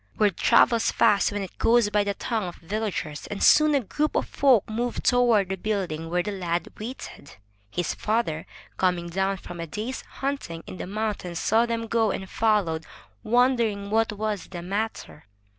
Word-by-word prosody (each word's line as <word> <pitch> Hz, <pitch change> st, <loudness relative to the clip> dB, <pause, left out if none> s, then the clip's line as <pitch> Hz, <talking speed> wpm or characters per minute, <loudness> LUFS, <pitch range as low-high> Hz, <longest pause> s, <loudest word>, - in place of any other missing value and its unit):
Word 210 Hz, -2 st, +3 dB
travels 235 Hz, -1 st, +4 dB
fast 205 Hz, 0 st, +3 dB
when 205 Hz, -1 st, -3 dB
it 190 Hz, -, -10 dB
goes 230 Hz, -2 st, +4 dB
by 210 Hz, -1 st, +3 dB
the 200 Hz, 0 st, -2 dB
tongues 210 Hz, -7 st, -3 dB
of -, -, -21 dB
villagers, 180 Hz, -6 st, -3 dB
and 205 Hz, -, -4 dB
soon 305 Hz, -1 st, +6 dB
a 275 Hz, -, +3 dB
group 300 Hz, +8 st, -2 dB
of -, -, +1 dB
folk 260 Hz, -7 st, +3 dB
moved 235 Hz, +3 st, -3 dB
toward 235 Hz, -6 st, +3 dB
the 190 Hz, -, -1 dB
building 180 Hz, -5 st, -3 dB
where 175 Hz, +1 st, +1 dB
the 210 Hz, -, -3 dB
lad 175 Hz, -3 st, -2 dB
waited. 220 Hz, -, -8 dB, 0.3 s
His 170 Hz, +10 st, -2 dB
father, 215 Hz, -8 st, -1 dB, 0.3 s
coming 180 Hz, -2 st, 0 dB
down 190 Hz, +2 st, 0 dB
from 175 Hz, -1 st, -9 dB
a 165 Hz, -, -4 dB
day's 220 Hz, +10 st, -4 dB
hunting 270 Hz, -12 st, -5 dB
in -, -, -8 dB
the -, -, -6 dB
mountains, 205 Hz, -4 st, -3 dB
saw 225 Hz, +7 st, +2 dB
them 230 Hz, -1 st, -2 dB
go, 225 Hz, -1 st, +1 dB
and 190 Hz, -, -3 dB
followed, 195 Hz, -8 st, +1 dB, 0.4 s
wondering 230 Hz, -4 st, +2 dB
what 225 Hz, 0 st, +2 dB
was 210 Hz, -3 st, -3 dB
the 175 Hz, -2 st, -7 dB
matter. 200 Hz, -, -4 dB
205 Hz, 175 wpm, -25 LUFS, 180-230 Hz, 0.4 s, soon